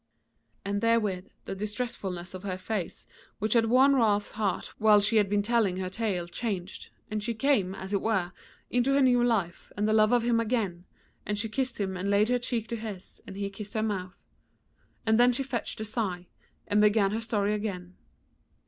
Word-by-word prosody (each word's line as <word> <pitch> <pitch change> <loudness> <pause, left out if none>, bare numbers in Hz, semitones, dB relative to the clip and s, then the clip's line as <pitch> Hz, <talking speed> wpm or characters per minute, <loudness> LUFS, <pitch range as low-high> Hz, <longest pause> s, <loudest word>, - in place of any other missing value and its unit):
And 200 0 -1
therewith 210 -5 +1 0.2
the - - -4
distressfulness 205 -4 -4
of 185 - -7
her 185 -2 -4
face 185 -1 -4 0.3
which 215 +1 0
had 230 -2 +4
worn 260 +4 +5
Ralph's 210 -5 +2
heart 210 -3 -2
while 215 -1 +6
she 210 +2 +2
had 205 -2 +3
been 205 0 +1
telling 215 -4 +1
her 185 -1 -3
tale 190 -5 -2
changed, 190 -1 -4 0.2
and 215 0 -1
she 235 +1 -2
came, 215 -7 +1
as 190 +1 -7
it 200 - +1
were, 190 -5 0 0.4
into 250 +3 +2
her 280 - +4
new 245 -2 +4
life 200 -8 -1
and 210 +1 +1
the 215 - +2
love 215 0 +4
of 245 -1 +3
him 235 -1 +2
again, 210 -7 -1 0.4
and 210 - -2
she 215 +2 -1
kissed 255 +2 -3
him 190 -2 -1
and 185 +2 -2
laid 205 +2 +3
her 250 0 +2
cheek 235 -2 -2
to 235 - -2
his 210 -4 -8
and 190 - -8
he 200 0 -2
kissed 210 +3 -9
her 220 - +1
mouth. 185 -4 -3 0.9
And 220 0 +3
then 245 +1 +6
she 250 +3 -1
fetched 250 -5 -3
a - - -2
sigh, 200 -5 -2 0.4
and 205 0 +3
began 210 -1 +4
with 215 - -1
her - - -3
story 210 -2 0
again. 190 -4 -4
210 Hz, 200 wpm, -28 LUFS, 195-230 Hz, 0.9 s, while